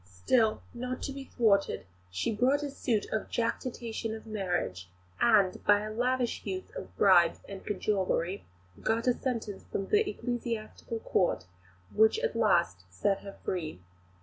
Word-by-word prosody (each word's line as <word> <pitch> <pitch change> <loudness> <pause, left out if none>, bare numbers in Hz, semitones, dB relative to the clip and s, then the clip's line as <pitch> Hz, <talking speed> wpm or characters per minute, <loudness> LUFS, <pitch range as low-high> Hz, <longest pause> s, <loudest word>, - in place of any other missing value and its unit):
Still, 215 - +2
not 250 +1 -4
to - - -2
be 275 0 -7
thwarted, 210 -7 +2 0.2
she 90 - -1
brought 265 +6 +3
a 285 - -3
suit 230 -6 0
of 220 - -2
jactitation 230 -1 -2
of 220 - -10
marriage, 180 - -2 0.3
and, 205 -5 +4
by 205 0 +5
a 215 0 -5
lavish 250 +1 0
use 185 -2 -5
of - - -8
bribes 175 -4 +5
and 195 -1 -8
cajolery, 195 -2 -1 0.4
got 225 +1 +1
a 250 - +4
sentence 230 -6 -3
from 195 - -2
the 420 0 +3
Ecclesiastical 230 - -4
Court 180 - +1 0.5
which 220 - +5
at 475 +1 -1
last 170 - +2
set 195 - +1
her 200 -1 -10
free. 160 - -3
215 Hz, 150 wpm, -30 LUFS, 190-240 Hz, 0.5 s, by